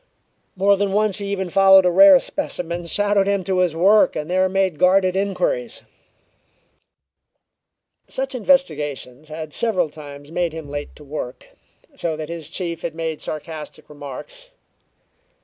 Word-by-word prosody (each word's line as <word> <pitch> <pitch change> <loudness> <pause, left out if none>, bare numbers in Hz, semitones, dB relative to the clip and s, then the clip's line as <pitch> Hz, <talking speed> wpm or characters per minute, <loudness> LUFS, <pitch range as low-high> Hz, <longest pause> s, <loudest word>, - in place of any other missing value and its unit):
More 200 +1 +3
than 200 0 -1
once 210 -1 +1
he 200 - -5
even 190 -3 -3
followed 195 0 +6
a 180 - +3
rare 290 +7 +8
specimen 175 - -4
shadowed 205 +1 +1
him 200 -1 0
to 185 0 -1
his 180 -3 +1
work 200 +5 +4
and 155 +3 -4
there 185 +1 +2
made 190 -4 0
guarded 185 0 +3
inquiries. - - -2 2.2
Such 265 0 -3
investigations 155 - 0
had 155 -1 -7
several 185 -9 0
times 145 -1 -11
made 170 -1 -1
him 160 -2 -7
late 145 0 -6
to 150 - -14
work, 140 -3 -7 0.4
so 160 -2 -3
that 155 0 -6
his 165 -3 -6
chief 170 -2 -4
had 160 - -5
made 160 -1 -4
sarcastic 155 0 -7
remarks. 150 - -9
180 Hz, 145 wpm, -21 LUFS, 155-200 Hz, 2.2 s, rare